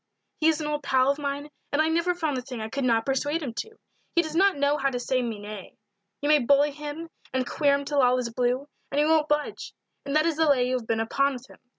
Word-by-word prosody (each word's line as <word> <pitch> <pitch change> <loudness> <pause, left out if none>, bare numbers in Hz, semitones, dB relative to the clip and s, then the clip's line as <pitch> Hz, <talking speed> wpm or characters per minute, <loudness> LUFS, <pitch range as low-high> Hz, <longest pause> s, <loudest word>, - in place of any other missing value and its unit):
"He 315 - +3
is 320 -1 +3
an 305 - -3
old 295 0 -2
pal 265 -1 +3
of 280 - -4
mine, 285 +1 -4 0.2
and 285 - 0
I 310 - +4
never 335 +2 +1
found 315 -5 -1
the 255 - -2
thing 250 -2 -7
I 220 0 -4
could 275 +4 -3
not 230 -2 +2
persuade 290 +4 -1
him 250 -5 -4
to. 445 - -6 0.4
He 340 - +4
does 315 -1 -6
not 390 -1 +4
know 285 +1 +2
how 275 -1 +1
to 250 -2 -3
say 255 +1 0
me 230 -3 -3
nay 205 -1 -9 0.4
you 290 - -1
may 300 0 +5
bully 285 +3 +3
him 300 +3 -7 0.3
and 260 -1 +1
queer 285 -2 +2
him 280 0 -3
till 285 0 +1
all 250 0 +4
is 235 -2 -3
blue, 250 +3 0 0.2
and 280 - -4
he 295 - +4
won't 310 -1 +3
budge, 295 0 -2 0.3
and 280 +1 -3
that 310 +1 +4
is 330 -2 0
the 320 -1 +3
lay 250 -3 +3
you 255 - -1
have 225 - -13
been 225 -1 0
upon 275 +5 +1
with 250 -1 -9
him. - - -17
280 Hz, 275 wpm, -26 LUFS, 255-300 Hz, 0.4 s, may